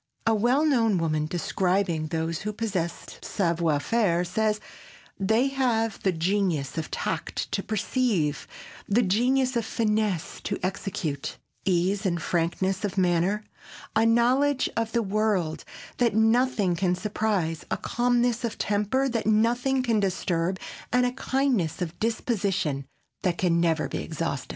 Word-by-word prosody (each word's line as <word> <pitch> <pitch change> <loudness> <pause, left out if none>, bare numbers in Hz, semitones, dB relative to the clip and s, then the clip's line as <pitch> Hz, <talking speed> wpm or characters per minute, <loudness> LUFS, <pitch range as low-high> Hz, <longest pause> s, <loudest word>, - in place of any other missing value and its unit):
A 225 - +4
well 245 +8 +3
known 230 -9 +3
woman, 155 -2 0
describing 180 -1 0
those 160 +1 -2
who 210 +1 -3
possess 200 -6 -3
savoir 170 -5 0
faire, 180 -1 +1
says: 215 +3 0 0.6
"They 220 +7 +2
have 235 -5 0
the 190 - +2
genius 170 -4 0
of 160 -1 -3
tact - - -3
to - - 0
perceive, 215 - 0 0.4
the 230 +4 +4
genius 250 +6 +2
of 235 - +1
finesse 215 -6 -1
to - - -1
execute, 175 -6 -3 0.3
ease 190 +2 +1
and 175 -4 0
frankness 185 +5 -1
of 200 -1 -2
manner, 185 +3 +2 0.5
a 220 - +4
knowledge 250 +5 +3
of 225 -1 -1
the 235 -1 +1
world 200 -5 0 0.3
that 235 -4 +2
nothing 225 -4 +3
can 180 +1 +1
surprise, 195 -5 -1
a - - 0
calmness 245 0 +1
of 230 -2 -2
temper 210 +7 +1
that 230 -4 -2
nothing 240 +5 +2
can 230 -3 +2
disturb, 185 -2 0 0.3
and 250 0 +3
a 245 - +1
kindness 255 - 0
of 175 -2 -4
disposition 200 - -1 0.3
that 180 -2 0
can 170 -2 +2
never 165 -2 +1
be - - -4
exhausted." 160 -4 -3
205 Hz, 140 wpm, -26 LUFS, 170-230 Hz, 0.6 s, A